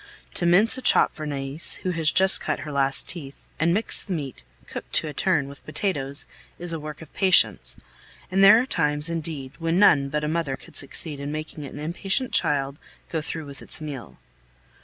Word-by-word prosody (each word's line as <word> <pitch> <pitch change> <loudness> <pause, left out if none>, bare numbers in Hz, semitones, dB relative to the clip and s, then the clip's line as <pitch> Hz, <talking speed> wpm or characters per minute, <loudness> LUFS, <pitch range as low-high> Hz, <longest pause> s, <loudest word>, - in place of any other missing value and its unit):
To 175 - +3
mince 210 +9 +4
a - - -9
chop - - +5
for 155 -1 -6
Nais, 140 +2 -1
who 185 - 0
has 165 -2 +2
just 190 0 +5
cut - - -2
her 150 +1 -6
last 135 -2 +1
teeth, 145 -6 -7
and 165 +2 +2
mix 210 +6 0
the 195 - -5
meat, 140 - -5 0.2
cooked - - -9
to - - +2
a 150 - -6
turn, 160 -7 +1
with 140 0 -12
potatoes, 145 -5 -2 0.3
is 175 -1 -4
a 165 - -3
work 150 +1 -8
of 155 - -17
patience, 110 - +3 0.5
and 195 +1 +3
there 210 +3 +9
are 250 - 0
times, 150 - +1
indeed, 150 -5 -5
when 165 +1 0
none 140 -8 +5
but 150 +1 -2
a - - -1
mother 155 -4 -2
could - - -17
succeed 145 +1 -2
in 140 +1 -5
making 155 -1 -6
an 140 - -9
impatient 190 - -2
child 140 -1 +2 0.3
go 160 - -2
through 155 +1 -5
with 140 -1 -10
its - - 0
meal. 145 -5 -8
155 Hz, 200 wpm, -24 LUFS, 140-170 Hz, 0.5 s, there